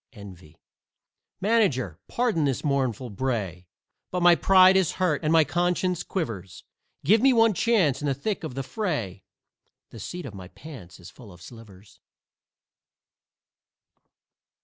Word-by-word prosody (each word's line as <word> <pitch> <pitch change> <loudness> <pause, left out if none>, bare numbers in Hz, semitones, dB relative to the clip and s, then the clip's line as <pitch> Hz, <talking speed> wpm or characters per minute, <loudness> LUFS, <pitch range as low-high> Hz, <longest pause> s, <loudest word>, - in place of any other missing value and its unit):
"ENVY" 95 -7 -13 0.8
Manager, 165 - +1
pardon 235 -10 0
this 135 -3 -2
mournful 130 -5 -1
bray, 100 -7 -4 0.4
But 180 -1 -2
my 175 0 +7
pride 185 +1 +5
is 190 -4 +2
hurt 175 -5 -1
and 155 - 0
my 165 -1 +5
conscience 175 +2 -1
quivers; 110 - -5 0.4
Give 215 +3 +4
me 265 0 +5
one 225 -2 +4
chance 185 - +1
in 145 - -2
the 135 - 0
thick 200 +9 -4
of 155 -6 -6
the 135 - -3
fray 130 - -4 0.7
The - - -11
seat 180 -1 -7
of 125 - -8
my 95 -2 -10
pants 95 - -13
is 90 - -13
full 115 -6 -15
of 90 - -16
slivers. 105 -1 -15
140 Hz, 140 wpm, -25 LUFS, -, 0.8 s, my